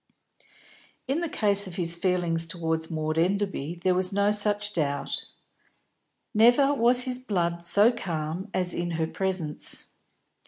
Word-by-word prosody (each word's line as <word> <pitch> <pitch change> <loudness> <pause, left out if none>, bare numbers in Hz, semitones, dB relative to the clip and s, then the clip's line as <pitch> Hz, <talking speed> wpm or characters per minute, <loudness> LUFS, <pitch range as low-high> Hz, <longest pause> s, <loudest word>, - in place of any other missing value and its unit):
In 275 +5 0
the 340 - -2
case 200 -4 +4
of 180 - -8
his 170 -2 -2
feeling 175 -1 0
towards 165 -1 -1
Maud 155 -1 -2
Enderby 185 -3 -1
there 185 - +3
was 185 0 0
no 200 +1 +2
such 210 0 +1
doubt. 145 -5 -2 1.1
Never 245 +6 +5
was 245 -1 +3
his 250 -1 -4
blood 170 -8 -2
so 205 +6 +4
calm 175 -3 -5
as 180 -2 -1
in 175 0 -3
her 160 - 0
presence. 180 -3 -1
185 Hz, 135 wpm, -26 LUFS, 165-210 Hz, 1.1 s, Never